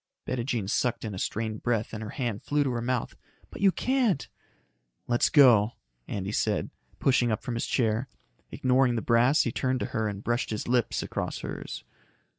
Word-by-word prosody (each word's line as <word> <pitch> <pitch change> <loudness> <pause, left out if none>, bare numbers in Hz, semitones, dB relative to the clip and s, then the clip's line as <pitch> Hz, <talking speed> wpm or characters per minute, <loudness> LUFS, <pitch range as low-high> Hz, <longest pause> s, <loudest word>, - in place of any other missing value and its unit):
Bettijean 120 -4 -2
sucked 120 +3 0
in 105 - -4
a 95 - -5
strained 110 +1 -3
breath 115 -3 -1
and 110 - -5
her 110 - -5
hand 120 -5 -3
flew 145 0 +1
to 135 - -1
her 120 -1 -2
mouth. 125 0 -2 0.4
"But - - -9
you 195 -1 +6
can't 250 - +1 0.4
" - - -48
"Let's 120 0 +3
go," 120 -6 +6 0.3
Andy 100 0 -3
said, - - 0 0.3
pushing 125 -3 +3
up 110 +1 -2
from 125 -1 -3
his 115 - -2
chair. 115 0 +1 0.4
Ignoring 130 -1 +2
the 115 - -2
brass, 120 +6 +4
he 120 - -1
turned 130 +2 0
to - - 0
her 110 -2 0
and 100 0 -5
brushed 120 +1 0
his 110 - -3
lips 120 -1 +1
across - - -4
hers. - - -6
120 Hz, 190 wpm, -28 LUFS, 110-130 Hz, 0.4 s, you